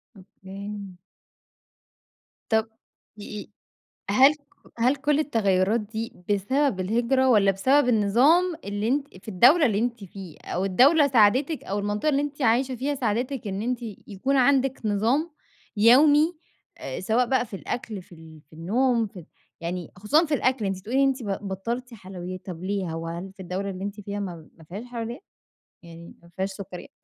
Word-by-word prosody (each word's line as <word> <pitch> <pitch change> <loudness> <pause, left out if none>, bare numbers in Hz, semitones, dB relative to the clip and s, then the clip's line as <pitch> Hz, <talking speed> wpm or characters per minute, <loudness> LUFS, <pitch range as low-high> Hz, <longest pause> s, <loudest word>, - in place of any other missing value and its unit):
أوكي. 195 0 -9 1.5
طب 220 0 +2 0.5
دقي 210 0 -8 0.6
هل 265 +8 +6
ك - - -23 0.4
هل 250 +4 +3
كل 295 +1 +1
التغيرات 210 -6 +2
دي 220 +2 -5 0.2
بسبب 215 +3 +1
الهجرة 240 +7 +1
والّا 205 -5 +5
بسبب 260 +8 +3
النظام 260 - +3
اللي 205 +1 -2
أنتِ 280 +3 0 0.2
في - - -19
الدولة 250 - +5
اللي 210 -5 +1
أنتِ 235 -2 -2
فيها 190 -3 -10
أو 185 +2 -1
الدولة 280 - +5
ساعدتِك 260 +5 +3
أو 200 +1 -3
المنطقة 205 +7 -1
اللي 280 -1 +2
أنتِ 290 0 -5
عايشة 255 +2 +2
فيها 275 +4 -2
ساعدتِك 245 0 -2
إن 195 0 -3
أنتِ 245 +2 -2 0.3
يكون 260 +8 -1
عندك 265 0 +3
نظام 235 +11 +1 0.5
يومي، 290 +9 +5 0.4
آآ، - - -6
سواء 225 +6 +1
بقى 260 0 +1
في 220 -3 -8
الأكل 215 0 -5
في 180 - -16
ال 160 -1 -14
في - - -21
النوم 230 +8 +1
في 195 - -12
ال 165 - -13 0.4
يعني 170 0 -4
خصوصًا 275 - +2
في 305 - -3
الأكل 260 -5 +1
أنتِ 195 -1 -2
بتقولي 250 +8 +1
أنتِ 270 -2 +1
ب - - -6 0.2
بطلتِ 235 +6 -4
حلويّات، 185 -3 -8
طب 180 -2 -7
ليه 190 -3 -2
وهل 165 +3 -5
في 195 - -37
الدولة 185 +3 -3
اللي 190 0 -6
أنتِ 205 +1 -5
فيها 205 0 -5
م - - -2 0.3
ما 165 - -16
فيهاش 205 +7 -7
حلويّات، 240 - -6 0.6
يعني 170 0 -12
ما 170 - -18
فيهاش 190 +3 -3
سُكريات؟ 190 -2 -9
220 Hz, 165 wpm, -25 LUFS, 195-260 Hz, 1.5 s, هل